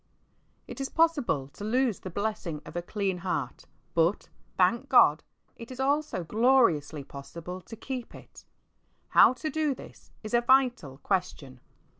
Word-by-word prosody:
I - - -7
T - - -8
is 270 - -3
possible 285 - +1
to 175 - -11
lose 240 0 +1
the 185 - -7
blessing 185 -5 -4
of - - -11
a 175 - -1
clean 190 0 -2
heart, 160 -8 -4 0.3
but, 170 +4 +1 0.3
thank 230 +9 +2
God, 155 - +6 0.4
it 230 - -10
is 255 0 -9
also 280 - 0
gloriously 210 - +2
possible 170 +7 -9
to 225 - -11
keep 250 +2 -6
it. - - -14 0.7
How - - +6
to 310 +4 -5
do 305 -3 0
this - - -14
is 215 - -7
a 240 - +4
vital 245 - +2
question. 170 -9 -2
210 Hz, 155 wpm, -28 LUFS, 170-260 Hz, 0.7 s, God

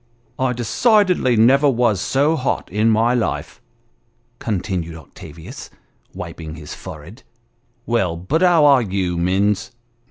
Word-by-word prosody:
" - - -35
I - - -1
decidedly 180 - +2
never 135 +6 +4
was 115 -6 +1
so 145 +8 +1
hot 130 - -2
in 105 +3 +2
my 115 +2 +2
life," 120 -3 -3 0.8
continued 90 -6 -3
Octavius, 80 +1 -11 0.4
wiping 80 -2 -8
his 75 -2 -9
forehead; 85 - -11 0.6
"well, 95 -8 0
but 135 - -1
how 175 -4 +5
are 140 -3 +6
you, 95 -4 -2
Minns? 95 +4 0
110 Hz, 125 wpm, -20 LUFS, 90-135 Hz, 0.8 s, are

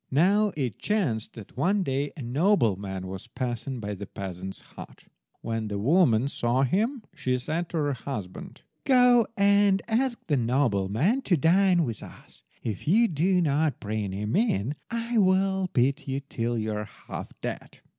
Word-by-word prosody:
Now 200 +9 +3
it 125 -8 -2
chanced 165 - -1
that 110 -4 -12
one 190 +9 +1
day 140 -1 -1
a 140 - -6
nobleman 115 - +1
was 95 0 -7
passing 125 0 -4
by 105 -1 -4
the 100 0 -7
peasant's 95 0 -7
hut. - - -13 0.4
When 115 -1 -3
the 100 -1 -3
woman 130 - +3
saw 125 -1 +1
him 220 - 0
she 130 -6 -1
said 160 +7 -3
to 170 - -3
her 145 -2 +1
husband— 110 -8 -7 0.2
"Go 245 -3 +5
and 200 -1 +4
ask 235 +2 +1
the 145 -4 +1
nobleman 120 - +1
to 180 -9 +2
dine 175 +3 +4
with 115 -7 -4
us. - - -14 0.2
If 110 +1 -5
you 225 +8 +5
do 180 +3 +2
not 150 -1 +1
bring 105 -1 -3
him 105 +3 -3
in 145 - +1 0.2
I 230 0 -1
will 190 -1 +2
beat 140 +3 +1
you 135 +1 -2
till 120 -3 -3
you 110 0 -2
are 105 0 -3
half - - -10
dead." - - -6
140 Hz, 165 wpm, -27 LUFS, -, 0.4 s, Go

